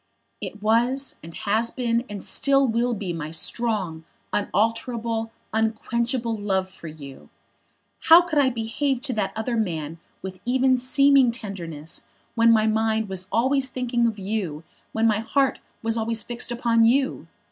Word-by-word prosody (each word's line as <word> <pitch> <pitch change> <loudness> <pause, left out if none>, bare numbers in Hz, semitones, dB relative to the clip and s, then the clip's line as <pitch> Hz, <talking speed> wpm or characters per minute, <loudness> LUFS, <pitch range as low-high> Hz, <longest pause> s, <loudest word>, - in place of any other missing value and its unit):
"It 210 - -7
was, 240 +5 +1
and 165 - -10
has 215 +7 0
been, 235 -1 -1
and 205 -2 -6
still 275 -1 +3
will 235 +1 +1
be 190 -4 -4
my 155 -2 -5
strong, 185 -2 -1 0.3
unalterable, 225 +2 -1 0.2
unquenchable 230 +2 0
love 190 -3 -1
for 170 - -11
you. 140 -4 -11 0.8
How 330 +2 +9
could 340 -4 0
I 270 -2 +4
behave 245 +3 -2
to 275 -4 0
that 210 -3 -1
other 220 +2 -2
man 165 -7 -2 0.2
with 190 -1 -7
even 260 +1 +3
seeming 275 +1 +4
tenderness 170 -9 -5 0.3
when 230 0 +5
my 220 -1 +4
mind 220 -1 +1
was 185 -1 -3
always 260 +3 +2
thinking 240 -2 0
of 220 -2 -2
you, 190 -6 -3 0.3
when 220 +1 0
my 215 -2 +3
heart 270 +4 +1 0.2
was 225 0 0
always 225 -1 -1
fixed 240 +1 -3
upon 235 -1 +2
you? 265 +4 +2
225 Hz, 150 wpm, -24 LUFS, 205-245 Hz, 0.8 s, How